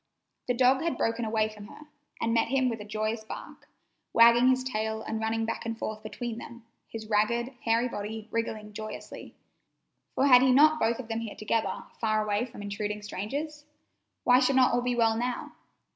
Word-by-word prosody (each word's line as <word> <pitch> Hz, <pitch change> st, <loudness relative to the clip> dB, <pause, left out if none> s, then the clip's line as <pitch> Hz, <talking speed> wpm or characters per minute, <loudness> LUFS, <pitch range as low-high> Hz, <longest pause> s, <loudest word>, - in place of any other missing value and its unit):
The 245 Hz, -, +1 dB
dog 260 Hz, +2 st, +4 dB
had 335 Hz, 0 st, -1 dB
broken 230 Hz, +1 st, 0 dB
away 215 Hz, 0 st, +1 dB
from 210 Hz, -1 st, -11 dB
her -, -, -13 dB, 0.4 s
and 230 Hz, 0 st, 0 dB
met 230 Hz, 0 st, +2 dB
him 260 Hz, 0 st, +2 dB
with 225 Hz, -2 st, -4 dB
a -, -, -8 dB
joyous 215 Hz, +1 st, -2 dB
bark, -, -, -10 dB, 0.4 s
wagging 235 Hz, +2 st, +7 dB
his 255 Hz, 0 st, +3 dB
tail 220 Hz, -3 st, -2 dB
and 220 Hz, -, -3 dB
running 225 Hz, 0 st, -1 dB
back 230 Hz, -, -3 dB
and 230 Hz, 0 st, -4 dB
forth 215 Hz, -1 st, -5 dB
between 235 Hz, -1 st, -5 dB
them, 235 Hz, -1 st, -11 dB, 0.2 s
his 220 Hz, -1 st, -7 dB
ragged, 235 Hz, +4 st, +1 dB
hairy 230 Hz, +2 st, +2 dB
body 215 Hz, -1 st, -6 dB
wriggling 215 Hz, -2 st, -3 dB
joyously; 215 Hz, +1 st, -8 dB, 0.8 s
for 270 Hz, -, +3 dB
had 250 Hz, -3 st, +8 dB
he 260 Hz, 0 st, +4 dB
not 305 Hz, +4 st, +6 dB
both 225 Hz, +1 st, +1 dB
of 260 Hz, -, -7 dB
them 225 Hz, 0 st, -2 dB
here 225 Hz, -2 st, -6 dB
together, 220 Hz, +1 st, -1 dB, 0.2 s
far 215 Hz, -1 st, +1 dB
away 210 Hz, +4 st, 0 dB
from 215 Hz, -4 st, -10 dB
intruding 210 Hz, +1 st, -4 dB
strangers? 290 Hz, +10 st, -5 dB, 0.6 s
Why 250 Hz, +1 st, +6 dB
should 260 Hz, +1 st, +2 dB
not 255 Hz, -2 st, +5 dB
all 245 Hz, -, +2 dB
be 245 Hz, 0 st, -1 dB
well 225 Hz, -1 st, +3 dB
now? 245 Hz, +2 st, -3 dB
230 Hz, 190 wpm, -28 LUFS, 215-250 Hz, 0.8 s, had